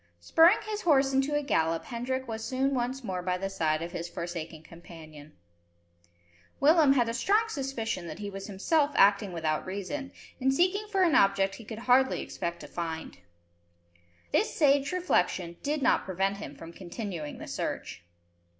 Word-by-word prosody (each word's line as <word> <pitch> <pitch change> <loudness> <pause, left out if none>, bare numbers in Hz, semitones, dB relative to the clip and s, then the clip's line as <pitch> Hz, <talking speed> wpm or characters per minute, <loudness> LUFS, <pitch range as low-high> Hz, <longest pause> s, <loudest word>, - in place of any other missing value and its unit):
Spurring 330 - +5
his 425 -1 -3
horse 275 -6 +3
into 270 +2 +1
a 295 - 0
gallop, 165 - 0
Hendrik 260 +2 -3
was 220 -1 -5
soon 265 +3 0
once 255 +1 -2
more 185 -4 -3
by 180 0 -1
the 195 +1 -4
side 155 -3 0
of 170 - -6
his 170 0 -5
forsaken 165 -2 -6
companion. 155 -3 -13 1.3
Willem 300 -1 +5
had 245 -4 +2
a 230 - -2
strong 410 - +2
suspicion 245 - -3
that - - -7
he 205 - -6
was 195 0 -7
himself 285 - +1
acting 200 0 +4
without 160 -3 -1
reason, 205 +9 -5 0.3
in 265 0 +2
seeking 370 +8 +1
for 390 -3 +1
an 335 -4 +3
object 195 -1 +3
he 210 - -10
could 220 0 -7
hardly 260 +1 +4
expect 170 0 -5
to - - -9
find. 165 - -5 1.1
This - - +2
sage 280 -2 +3
reflection 180 - 0
did 290 0 -1
not - - +3
prevent 195 +1 -1
him 205 - -8
from 165 0 -11
continuing 175 -4 -6
the - - -8
search. 85 - -5
215 Hz, 170 wpm, -29 LUFS, 175-275 Hz, 1.3 s, Spurring